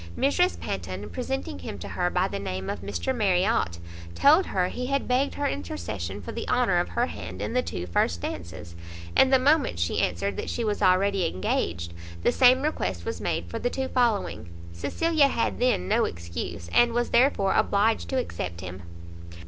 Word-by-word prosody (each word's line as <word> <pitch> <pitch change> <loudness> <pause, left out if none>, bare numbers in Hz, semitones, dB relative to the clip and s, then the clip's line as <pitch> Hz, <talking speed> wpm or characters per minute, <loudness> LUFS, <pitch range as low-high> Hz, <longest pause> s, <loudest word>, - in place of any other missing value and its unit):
Mrs 355 +7 +2
Panton, 95 +2 -5
presenting 255 - -4
him 90 +3 -6
to 90 - -7
her 180 0 0
by 180 +1 +1
the 200 - -4
name 95 - -4
of - - -6
Mr 85 -4 -2
Marriot, 185 - +1 0.4
told 315 +6 +5
her 180 -2 +1
he 250 0 -4
had 275 0 -1
begged 255 +3 +1
her 290 - 0
intercession 95 +1 -4
for - - -6
the - - -5
honour - - +3
of - - -1
her - - +1
hand 95 - -7
in 105 +1 -3
the 125 - +3
two 85 -1 -5
first 85 -1 0
dances; 85 -1 -6 0.4
and 265 - +5
the 265 - +7
moment 280 - +2
she 85 0 0
answered 95 +2 -1
that - - -4
she 235 - -2
was 210 -2 -1
already 190 0 +3
engaged, 85 - -2 0.3
the - - +4
same 255 +1 +5
request 90 - -2
was - - -4
made 85 - -1
for 85 - -5
the 245 - 0
two 265 +1 -3
following. 200 - 0 0.2
Cecilia 310 - +2
had 235 - -1
then 245 - +1
no - - +3
excuse, 85 +1 -6
and 240 -1 +5
was 240 0 0
therefore 235 -6 +3
obliged 215 +3 +2
to 265 - -1
accept 90 - -4
him. 90 0 -7
180 Hz, 190 wpm, -26 LUFS, -, 0.4 s, the